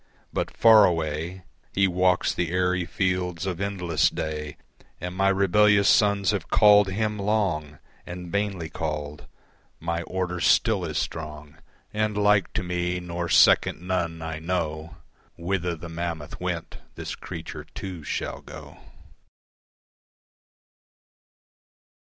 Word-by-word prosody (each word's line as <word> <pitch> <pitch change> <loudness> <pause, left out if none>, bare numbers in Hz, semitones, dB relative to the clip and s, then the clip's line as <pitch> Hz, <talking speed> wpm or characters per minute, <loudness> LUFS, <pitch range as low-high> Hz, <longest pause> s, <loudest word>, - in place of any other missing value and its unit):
But - - -1
far 110 -2 +8
away 80 +2 -2 0.3
He 100 0 +4
walks 90 0 +2
the 85 -2 -1
airy 90 0 +1
fields 90 -2 -1
of 95 -1 -3
endless 90 -5 +1
day, 75 -1 -5 0.4
And 90 +1 -5
my 95 +1 +3
rebellious 100 +1 +4
sons 100 -4 +4
have - - -3
called 105 -1 +6
Him 105 +2 -1
long 95 -8 -1 0.3
And 90 0 -8
vainly 100 -5 -1
called. 75 -2 -5 0.5
My 85 0 -2
order 90 0 -3
still - - +3
is - - -3
strong 75 -1 -5 0.4
And 105 -1 -1
like 105 -2 +3
to - - -1
me 90 0 -2
nor 85 -1 -4
second - - +5
none 85 -3 -2
I 80 -1 -4
know. 80 -2 -3 0.4
Whither 90 0 -2
the 85 +1 -9
mammoth 85 -2 -5
went - - -4 0.2
this - - -5
creature - - -8
too 90 -5 -6
shall - - -4
go. - - -11
90 Hz, 120 wpm, -25 LUFS, 80-95 Hz, 0.5 s, far